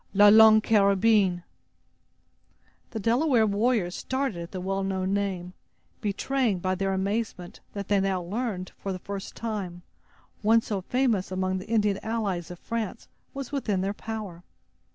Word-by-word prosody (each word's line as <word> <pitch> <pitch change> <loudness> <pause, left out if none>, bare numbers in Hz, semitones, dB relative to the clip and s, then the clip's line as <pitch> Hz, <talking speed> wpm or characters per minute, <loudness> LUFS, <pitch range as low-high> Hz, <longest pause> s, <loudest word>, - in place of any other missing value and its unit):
"La 205 +1 +8
Longue 220 0 +8
Carabine!" 200 -3 +3 1.5
The 225 - -5
Delaware 235 +2 +3
warriors 210 -3 +1
started 260 -8 -2
at 170 - -8
the 185 - -5
well 195 +1 -2
known 190 0 -1
name, 190 -3 -2 0.5
betraying 220 +1 0
by 185 +1 -1
their 195 +1 -1
amazement, 195 -1 -3
that 200 -1 -5
they 205 -1 +3
now 190 -2 0
learned, 195 -1 -3
for 195 - -4
the 185 - -3
first 195 +1 -7
time, 195 -6 -4 0.6
one 225 +2 +4
so 205 -3 -3
famous 230 -3 0
among 185 0 -1
the 185 - -10
Indian 210 -3 +2
allies 205 -7 -2
of 180 - -8
France 230 +2 -5 0.3
was 275 -2 -5
within 215 -9 -1
their 195 +1 -1
power. 205 -6 -6
200 Hz, 150 wpm, -27 LUFS, 185-225 Hz, 1.5 s, La